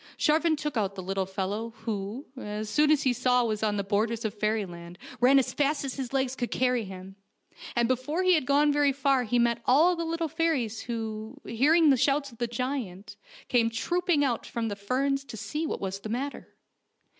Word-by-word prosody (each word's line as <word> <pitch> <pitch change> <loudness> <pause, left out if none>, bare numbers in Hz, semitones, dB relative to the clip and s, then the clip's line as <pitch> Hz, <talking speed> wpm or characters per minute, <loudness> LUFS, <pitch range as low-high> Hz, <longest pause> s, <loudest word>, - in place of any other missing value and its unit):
Sharvan 315 +1 +2
took 300 -3 -3
out 200 -2 -1
the 190 - -6
little 190 0 -2
fellow, 205 +4 -3
who, 215 +3 -4
as 210 -3 -5
soon 300 +6 +3
as 305 -2 +4
he 260 - +3
saw 250 0 +2
he 230 - -1
was 215 -1 -2
on 210 -1 0
the 200 - -1
borders 220 +3 0
of 215 - -1
fairyland 195 -5 -3 0.2
ran 255 +3 +6
as 265 - +1
fast 290 0 0
as 265 - -3
his 260 -3 -4
legs 265 -1 0
could 245 -2 -3
carry 250 -3 +1
him, 190 0 -10 0.6
and 235 -1 +2
before 260 +8 -1
he 370 0 +5
had 305 -7 +1
gone 290 +1 +4
very 290 -1 +3
far 270 -2 +2
he 245 +2 +1
met 235 -1 +2
all 320 +8 +5
the 335 - -3
little 330 0 -2
fairies 290 -9 -1
who, 225 +1 -5
hearing 300 +6 +4
the 265 - +4
shouts 275 +2 +1
of 230 - -17
the 240 - 0
giant, 230 -5 -4 0.3
came 235 -2 +3
trooping 305 - +1
out 240 -4 -1
from 230 -2 -3
the 205 - -3
ferns 270 +7 -1
to 245 -5 -9
see 310 +9 -3
what - - -3
was 195 0 -4
the 215 - -7
matter. 265 +5 -5
245 Hz, 210 wpm, -28 LUFS, 215-280 Hz, 0.6 s, ran